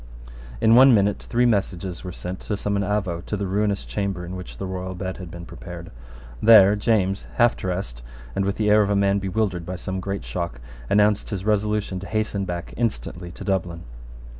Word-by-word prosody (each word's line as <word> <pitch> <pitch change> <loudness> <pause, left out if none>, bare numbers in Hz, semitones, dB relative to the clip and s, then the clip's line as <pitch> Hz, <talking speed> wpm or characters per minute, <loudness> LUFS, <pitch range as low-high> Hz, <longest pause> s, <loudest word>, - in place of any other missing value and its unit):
In 110 - +5
one 130 +1 +8
minute 100 0 +2
three 120 +1 +1
messages 95 -5 -1
were 90 - -5
sent 90 +1 -6
to 105 - -3
summon 100 0 -1
Avaux 100 -4 -1
to 105 - -2
the 100 - -2
ruinous 100 +1 0
chamber 100 -3 -3
in 90 +2 -6
which 90 -1 -8
the 95 - -4
royal 95 0 -4
bed 95 0 -4
had 90 -2 -8
been 85 0 -9
prepared. - - -9 0.5
There 105 -3 +8
James, 100 -3 +1
half 120 -1 +4
dressed, 90 -10 -4 0.3
and 100 - +1
with 100 +1 0
the 105 -1 +1
air 105 0 +6
of 100 - +1
a 100 - +2
man 100 0 +3
bewildered 95 -2 -1
by 90 +2 -5
some 95 +1 -4
great 100 +1 -4
shock, 85 -9 -4 0.3
announced 105 0 +3
his 100 -3 -4
resolution 105 -2 0
to 95 - -8
hasten 110 -2 -1
back 85 -1 -5
instantly 100 -6 -2
to - - -9
Dublin. 90 -4 -2
100 Hz, 195 wpm, -23 LUFS, 90-105 Hz, 0.5 s, one